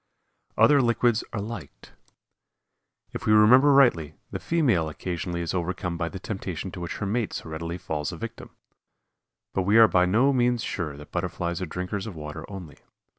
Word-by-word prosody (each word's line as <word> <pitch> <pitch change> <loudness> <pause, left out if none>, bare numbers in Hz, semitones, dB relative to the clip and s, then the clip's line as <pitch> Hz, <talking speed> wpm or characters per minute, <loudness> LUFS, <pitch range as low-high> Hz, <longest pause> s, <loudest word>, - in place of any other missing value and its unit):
OTHER 145 -2 +6
LIQUIDS 120 -1 +2
ARE 105 - -3
LIKED. 110 +1 -8 1.2
If - - -6
we 105 - +5
remember 125 +7 +7
rightly, 85 - +4 0.2
the - - -4
female 120 - +1
occasionally 85 +2 -4
is 85 - -3
overcome 90 0 -2
by 85 0 -2
the 95 - -7
temptation 95 -2 -5
to 90 - -8
which 85 -1 -5
her 100 - -3
mate 110 +2 -1
so - - -6
readily 85 +2 -4
falls 75 -4 -3
a - - -7
victim. - - -8 1.0
But 95 - 0
we 100 +4 +3
are 115 -1 +9
by 90 -1 +3
no 120 +9 +3
means 120 -2 +1
sure 75 -6 -4
that 75 - -13
Butterflies 85 0 -3
are 90 - -3
drinkers 90 +5 -4
of 100 - -7
water 75 -1 -8
only. 90 -7 -9
95 Hz, 175 wpm, -26 LUFS, 85-115 Hz, 1.2 s, are